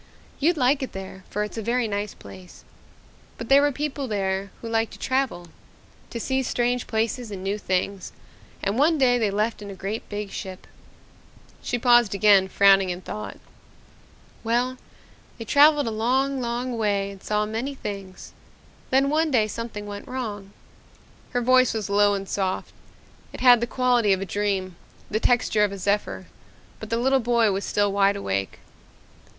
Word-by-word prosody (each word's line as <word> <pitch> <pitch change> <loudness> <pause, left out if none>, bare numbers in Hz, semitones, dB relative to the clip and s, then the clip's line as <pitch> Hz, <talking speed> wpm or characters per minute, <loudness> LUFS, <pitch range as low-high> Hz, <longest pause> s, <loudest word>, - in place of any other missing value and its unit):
You'd 325 +4 +2
like 270 +1 +2
it 265 - -5
there 190 0 -8
for 210 - -2
it's 210 +2 -5
a - - -3
very 235 +2 0
nice 205 -1 -3
place. 95 -2 -13 0.7
But 230 - -7
there 275 +1 +7
were 290 0 +3
people 285 0 -3
there 195 -2 -2
who - - -4
liked 225 0 0
to - - -10
travel 260 -10 -1 0.6
to 235 - -5
see 265 +3 0
strange 245 -1 -1
places 225 +2 -1
and 195 -2 -7
new 200 +2 -2
things, 190 0 -2 0.5
and 200 +5 0
one 315 +3 +4
day 245 -3 +3
they 215 -3 +1
left 210 +2 -1
in 205 - -8
a 195 - -7
great 200 +4 -5
big 205 -1 -5
ship." 185 -1 -7 1.0
She 245 - -2
paused 240 -3 +4
again, 200 -1 +5
frowning 195 -1 +4
in 180 0 -4
thought. 105 - -7 1.1
"Well, 245 +3 0 0.6
they 225 - -7
traveled 290 +2 +5
a 225 - -2
long, 260 +5 0
long 240 0 -3
way 200 -2 0
and 195 -1 -13
saw 210 0 0
many 230 +6 -4
things. 195 -6 -8 0.6
Then 270 +1 +3
one 315 +1 +2
day 240 -6 +3
something 215 -1 -6
went 205 0 -8
wrong." 210 -6 -5 0.8
Her 245 - -1
voice 255 0 +4
was 210 -2 -3
low 205 0 +4
and 195 0 -5
soft. 190 -1 -2 0.6
It - - -8
had 245 -2 +7
the 235 - 0
quality 245 -5 +2
of 190 - -1
a 195 - -3
dream, 190 -1 -2 0.3
the 215 - +1
texture 225 -3 +2
of 205 - +1
a 200 - -6
zephyr, 200 +2 -1 0.5
but - - -8
the 230 - 0
little 265 +3 +2
boy 235 -3 +2
was 195 +1 -2
still 205 -1 +1
wide 200 0 +3
awake. 100 - -3
215 Hz, 175 wpm, -24 LUFS, 200-250 Hz, 1.1 s, there